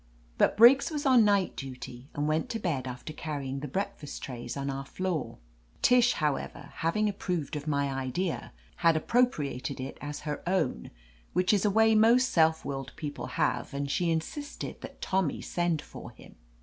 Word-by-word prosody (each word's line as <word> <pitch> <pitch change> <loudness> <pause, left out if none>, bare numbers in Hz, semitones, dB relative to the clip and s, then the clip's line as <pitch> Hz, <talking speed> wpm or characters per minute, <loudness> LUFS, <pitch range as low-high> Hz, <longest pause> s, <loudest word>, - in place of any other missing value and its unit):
But - - +3
Briggs 245 +7 +7
was 295 -3 -3
on 255 -4 +6
night 200 -3 +2
duty, 130 -1 -8
and 145 +1 0
went 155 +1 0
to 225 - -2
bed 145 - -2
after 125 +5 -7
carrying 140 -4 -4
the 150 - -5
breakfast 190 -1 -4
trays 125 +1 -6
on 140 0 -3
our 135 0 -3
floor. 180 +3 -3 0.5
Tish, 250 0 +5
however, 150 -3 -2
having 190 +6 +1
approved 180 -7 -2
of 150 +1 -5
my 140 -2 0
idea, 135 +7 -2 0.3
had 165 -1 +4
appropriated 145 - 0
it 130 +1 -6
as 145 0 -5
her 150 -1 -4
own 165 - 0 0.2
— - - -31
which 180 +3 +3
is 205 0 +2
a - - +5
way 220 +2 +4
most 235 +3 +5
self 160 -1 +3
willed 135 -1 -4
people 145 -2 -5
have, - - -1
and 140 0 -2
she 175 +2 +1
in 160 -1 +2
sisted 290 - -7
that - - -10
Tommy 190 -5 0
send 175 -3 -1
for - - -10
him. - - -16
160 Hz, 180 wpm, -29 LUFS, 140-200 Hz, 0.5 s, Briggs